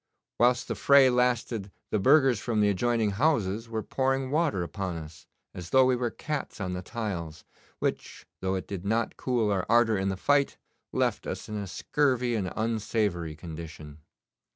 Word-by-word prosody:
Whilst 120 Hz, +1 st, +3 dB
the -, -, -1 dB
fray 140 Hz, -2 st, +6 dB
lasted 120 Hz, -4 st, 0 dB, 0.2 s
the 105 Hz, -, +1 dB
burghers 135 Hz, 0 st, +5 dB
from 115 Hz, -1 st, -1 dB
the 105 Hz, -1 st, +4 dB
adjoining 110 Hz, +2 st, +1 dB
houses 115 Hz, -3 st, 0 dB
were 110 Hz, -1 st, -3 dB
pouring 135 Hz, 0 st, -1 dB
water 150 Hz, -, +1 dB
upon 90 Hz, +1 st, -4 dB
us, 80 Hz, -1 st, -10 dB, 0.3 s
as 90 Hz, -2 st, -8 dB
though 130 Hz, +4 st, +5 dB
we 130 Hz, 0 st, +3 dB
were 120 Hz, -1 st, -1 dB
cats 150 Hz, +3 st, -5 dB
on 90 Hz, -2 st, -3 dB
the 90 Hz, -, -4 dB
tiles, 90 Hz, -7 st, -5 dB, 0.3 s
which, -, -, -3 dB
though 95 Hz, 0 st, -1 dB
it 95 Hz, -, -4 dB
did 95 Hz, -3 st, -5 dB
not 110 Hz, +3 st, 0 dB
cool 120 Hz, -5 st, 0 dB
our 95 Hz, -2 st, +1 dB
ardour 115 Hz, -3 st, +4 dB
in 95 Hz, 0 st, 0 dB
the 95 Hz, -, -2 dB
fight, 145 Hz, +7 st, +2 dB, 0.3 s
left -, -, 0 dB
us -, -, -5 dB
in 105 Hz, -, -5 dB
a 100 Hz, -1 st, -4 dB
scurvy 125 Hz, +4 st, 0 dB
and 100 Hz, -5 st, -1 dB
unsavoury 105 Hz, -7 st, -1 dB
condition. 80 Hz, -2 st, -9 dB
110 Hz, 175 wpm, -28 LUFS, 95-125 Hz, 0.3 s, fray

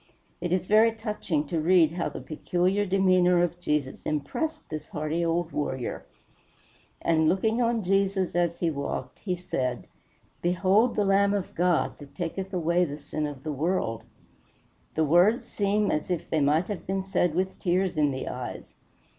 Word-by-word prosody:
It 175 Hz, -, -2 dB
is 185 Hz, -1 st, +1 dB
very 215 Hz, +3 st, +5 dB
touching 210 Hz, -9 st, -2 dB
to 165 Hz, +3 st, -2 dB
read 165 Hz, -1 st, +5 dB
how 170 Hz, +1 st, -2 dB
the -, -, -8 dB
peculiar 180 Hz, +5 st, 0 dB
demeanor 185 Hz, -2 st, +4 dB
of 175 Hz, 0 st, -2 dB
Jesus 150 Hz, -5 st, -2 dB
impressed 155 Hz, -, -3 dB
this 155 Hz, -1 st, -6 dB
hardy 155 Hz, +3 st, -2 dB
old 165 Hz, 0 st, 0 dB
warrior: 130 Hz, -4 st, -3 dB, 1.0 s
"And 160 Hz, -1 st, +3 dB
looking 220 Hz, +5 st, +1 dB
on 230 Hz, -2 st, +1 dB
Jesus 195 Hz, -1 st, +1 dB
as 170 Hz, -1 st, 0 dB
he 170 Hz, -2 st, +2 dB
walked, 140 Hz, -1 st, -4 dB
he 185 Hz, -3 st, -2 dB
said, 130 Hz, -9 st, -3 dB, 0.6 s
Behold 190 Hz, +7 st, +3 dB
the 205 Hz, -, +2 dB
Lamb 200 Hz, +1 st, +3 dB
of 195 Hz, -3 st, -3 dB
God, 175 Hz, -1 st, +1 dB
that 145 Hz, -2 st, -13 dB
taketh 190 Hz, +2 st, -4 dB
away 175 Hz, -1 st, +2 dB
the 145 Hz, -4 st, -3 dB
sin 150 Hz, +1 st, -3 dB
of 140 Hz, -3 st, -8 dB
the 155 Hz, -2 st, -3 dB
world." 140 Hz, -7 st, -1 dB, 0.9 s
The 160 Hz, -, +2 dB
words 180 Hz, -, +4 dB
seem 205 Hz, 0 st, +1 dB
as 150 Hz, -, -2 dB
if 175 Hz, -2 st, -2 dB
they 160 Hz, -, +2 dB
might 150 Hz, +5 st, +2 dB
have 205 Hz, -3 st, -6 dB
been 190 Hz, 0 st, -1 dB
said 180 Hz, -4 st, 0 dB
with 190 Hz, +1 st, -1 dB
tears 185 Hz, 0 st, +1 dB
in 150 Hz, -2 st, +3 dB
the 130 Hz, -1 st, -4 dB
eyes. -, -, -6 dB
175 Hz, 170 wpm, -27 LUFS, 155-195 Hz, 1.0 s, very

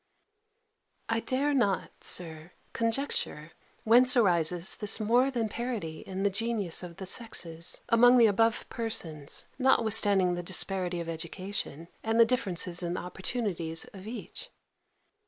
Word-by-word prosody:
I 225 Hz, 0 st, +1 dB
dare 275 Hz, +5 st, 0 dB
not, 205 Hz, -8 st, -1 dB
Sir, 160 Hz, -1 st, -2 dB, 0.2 s
conjecture 230 Hz, -, -1 dB, 0.3 s
whence 250 Hz, +3 st, +5 dB
arises 175 Hz, -4 st, +2 dB
this 210 Hz, +1 st, +1 dB
more 240 Hz, +5 st, +3 dB
than 235 Hz, -4 st, -1 dB
parity 215 Hz, -9 st, -4 dB
in 190 Hz, 0 st, -5 dB
the 200 Hz, -, +2 dB
genius 210 Hz, -4 st, -1 dB
of 175 Hz, -2 st, -9 dB
the 190 Hz, -, -7 dB
sexes, 170 Hz, -6 st, -2 dB
among 245 Hz, +1 st, +6 dB
the 235 Hz, -, +7 dB
above 225 Hz, +2 st, +2 dB
persons, 165 Hz, -11 st, -4 dB
notwithstanding 215 Hz, -7 st, +4 dB
the 175 Hz, -, -3 dB
disparity 180 Hz, 0 st, 0 dB
of 170 Hz, -, -7 dB
education, 170 Hz, 0 st, -5 dB
and 225 Hz, +1 st, 0 dB
the 230 Hz, -, +8 dB
difference 185 Hz, -7 st, -1 dB
in 175 Hz, 0 st, -2 dB
the -, -, -3 dB
opportunities 180 Hz, -3 st, -3 dB
of 195 Hz, 0 st, -11 dB
each. 250 Hz, -, -7 dB
200 Hz, 135 wpm, -29 LUFS, 175-230 Hz, 0.3 s, the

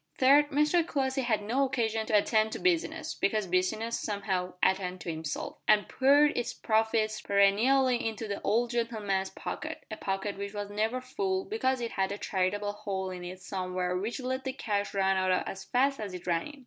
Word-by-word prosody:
Third, 285 Hz, +3 st, +5 dB
Mr 300 Hz, +4 st, +3 dB
Crossley 270 Hz, -4 st, -1 dB
had 220 Hz, -4 st, 0 dB
no 245 Hz, +7 st, +1 dB
occasion 225 Hz, -5 st, -1 dB
to 210 Hz, -, +4 dB
attend 215 Hz, +1 st, +2 dB
to -, -, -4 dB
business, 320 Hz, -3 st, 0 dB
because 210 Hz, +1 st, 0 dB
business, 190 Hz, +6 st, 0 dB
somehow, 195 Hz, -3 st, -2 dB
attended 185 Hz, -1 st, +1 dB
to 170 Hz, -, -3 dB
itself, 155 Hz, -2 st, -5 dB
and 210 Hz, -1 st, +4 dB
poured 285 Hz, +3 st, +4 dB
its 240 Hz, -1 st, -2 dB
profits 220 Hz, -1 st, +1 dB
perennially 235 Hz, +6 st, +3 dB
into 220 Hz, 0 st, -6 dB
the 200 Hz, -1 st, -4 dB
old 235 Hz, +3 st, +1 dB
gentleman's 215 Hz, -5 st, -1 dB
pocket -, -, -6 dB
a -, -, -4 dB
pocket 195 Hz, +1 st, -3 dB
which 200 Hz, +1 st, -5 dB
was 205 Hz, 0 st, -4 dB
never 220 Hz, +5 st, -1 dB
full, 380 Hz, +9 st, -2 dB
because 265 Hz, -, 0 dB
it 235 Hz, -, -3 dB
had 190 Hz, 0 st, 0 dB
a 200 Hz, -, -3 dB
charitable 205 Hz, +2 st, -1 dB
hole 195 Hz, -2 st, -4 dB
in 180 Hz, -1 st, -7 dB
it 185 Hz, +1 st, -8 dB
somewhere 185 Hz, -1 st, -2 dB
which 210 Hz, +8 st, -3 dB
let 260 Hz, +1 st, -3 dB
the 265 Hz, -, -3 dB
cash 205 Hz, -6 st, -2 dB
run 195 Hz, -1 st, +2 dB
out 185 Hz, -1 st, +1 dB
as 190 Hz, 0 st, -6 dB
fast 275 Hz, +2 st, +1 dB
as 200 Hz, -4 st, -5 dB
it 180 Hz, -, -9 dB
ran 170 Hz, -2 st, 0 dB
in. 295 Hz, -1 st, -12 dB
215 Hz, 190 wpm, -29 LUFS, 195-260 Hz, -, Third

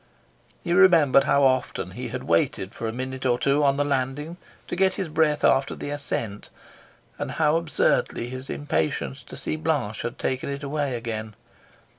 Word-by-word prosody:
He 170 Hz, -, 0 dB
remembered 165 Hz, -8 st, +6 dB
how 140 Hz, 0 st, +3 dB
often 130 Hz, -1 st, +1 dB
he -, -, -6 dB
had -, -, -5 dB
waited 85 Hz, +3 st, 0 dB
for 115 Hz, -, -4 dB
a -, -, -1 dB
minute 130 Hz, +2 st, -5 dB
or 125 Hz, -2 st, +2 dB
two 140 Hz, +3 st, +2 dB
on 140 Hz, -1 st, +3 dB
the 145 Hz, -, +2 dB
landing 145 Hz, +4 st, -2 dB, 0.3 s
to -, -, -3 dB
get 190 Hz, +1 st, +3 dB
his 190 Hz, -3 st, -3 dB
breath 150 Hz, -1 st, +1 dB
after 135 Hz, +1 st, +3 dB
the 145 Hz, -, -5 dB
ascent, 115 Hz, -8 st, -4 dB, 0.7 s
and -, -, -3 dB
how 155 Hz, -1 st, +2 dB
absurdly 155 Hz, -6 st, +1 dB
his 130 Hz, +1 st, -7 dB
impatience 80 Hz, -, -2 dB
to -, -, -11 dB
see 75 Hz, -, -3 dB
Blanche 80 Hz, -, -1 dB
had -, -, -4 dB
taken 130 Hz, +1 st, -2 dB
it 140 Hz, +1 st, -5 dB
away 140 Hz, -2 st, -1 dB
again. 110 Hz, -2 st, -5 dB
140 Hz, 175 wpm, -25 LUFS, 120-150 Hz, 0.7 s, remembered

